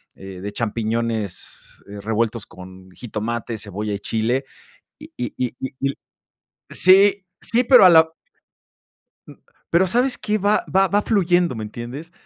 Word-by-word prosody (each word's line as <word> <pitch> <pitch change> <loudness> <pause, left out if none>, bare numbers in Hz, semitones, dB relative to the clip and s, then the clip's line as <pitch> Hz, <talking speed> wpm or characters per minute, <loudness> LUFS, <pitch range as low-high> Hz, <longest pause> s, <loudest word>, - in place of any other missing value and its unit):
eh, 95 -1 -10
de 100 +1 -5
champiñones, 115 -2 -4
eh, 100 0 -8
revueltos 110 +1 -1
con 95 0 -13
jitomate, 115 +1 -5
cebolla 105 0 -5
y 100 - -4
chile, 120 +6 -1 0.5
y - - -13
y 120 -3 -4
y 125 - -5
y 130 - -4
y 135 - 0
l 135 - -4 0.8
sí, 195 +1 +4 0.2
sí, 240 +2 +1
pero 250 -4 +7
a 180 - +9
la 160 -1 +5 1.1
Mm, - - -11 0.4
pero, 180 +3 +3
¿sabes 245 +6 +1
qué?, 215 0 -1
va 205 +1 +1
va 195 0 +4
va 205 +2 +1
fluyendo, 175 - +1
¿me 110 - -5
entiendes? 120 +10 -8
120 Hz, 150 wpm, -21 LUFS, -, 1.1 s, a